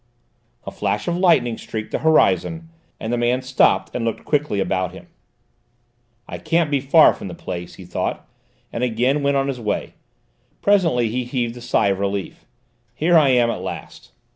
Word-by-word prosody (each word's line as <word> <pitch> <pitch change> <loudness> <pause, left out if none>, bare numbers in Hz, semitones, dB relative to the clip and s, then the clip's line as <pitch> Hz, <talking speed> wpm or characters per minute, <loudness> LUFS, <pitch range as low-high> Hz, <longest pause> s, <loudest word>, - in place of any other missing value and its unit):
A - - -5
flash 105 - -2
of 175 - 0
lightning 165 -11 +2
streaked 110 -1 -6
the - - -1
horizon, 160 - +2 0.3
and 110 +2 -3
the 120 - 0
man 125 +2 +1
stopped 130 0 +2
and 125 - -2
looked 115 -1 -3
quickly 150 -8 0
about 95 -2 -1
him. 95 - -13 1.2
"I - - -7
can't 165 -3 0
be 140 - +2
far 140 +4 +5
from - - -8
the 90 - -7
place," 85 0 -7
he 95 - -12
thought, 90 - -4 0.5
and 115 - -2
again 125 +4 +1
went 140 0 +1
on 135 0 0
his 135 -3 -3
way. 105 -3 -3 0.7
Presently 165 - +2
he 125 +3 -2
heaved 120 -1 -3
a 120 - -10
sigh 120 -4 +1
of 95 -1 -1
relief. 100 -1 -4 0.5
"Here 170 +6 +2
I 150 -4 +6
am 120 -2 +3
at - - -5
last." - - -8
125 Hz, 180 wpm, -21 LUFS, 105-145 Hz, 1.2 s, I